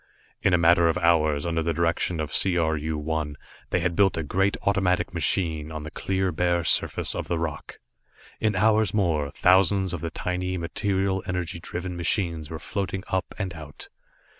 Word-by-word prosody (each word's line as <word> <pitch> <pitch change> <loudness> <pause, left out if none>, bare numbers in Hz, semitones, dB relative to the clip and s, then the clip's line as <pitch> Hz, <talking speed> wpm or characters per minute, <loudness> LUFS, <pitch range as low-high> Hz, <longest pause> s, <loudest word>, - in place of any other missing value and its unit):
In 95 - +3
a 90 - +5
matter 85 0 +5
of 85 +1 +1
hours, 80 -4 +2
under 85 -1 0
the 85 0 -1
direction 85 0 0
of 75 -1 -3
C 95 -2 +2
R 80 -2 +2
U 80 +1 -3
1, 75 -1 -2 0.3
they - - +1
had 90 -1 0
built 95 -2 +3
a 80 - -1
great 95 +6 +1
automatic 95 -3 +1
machine 80 -2 0
on 75 -1 -6
the 75 - -7
clear 95 -1 -1
bare 85 +1 +1
surface - - +1
of - - -4
the 85 - -1
rock. 80 -2 -5 0.6
In 105 -2 +1
hours 105 0 +3
more, 80 -8 +1
thousands 95 0 +4
of 85 - -4
the 85 - -3
tiny, 90 +2 -3
material 95 +3 -1
energy 90 -2 -3
driven 90 +2 -5
machines 85 -3 -1
were 80 - -5
floating 95 +2 -4
up 95 -1 -2
and 95 -4 -3
out. 75 -3 -9
85 Hz, 185 wpm, -25 LUFS, 80-95 Hz, 0.6 s, a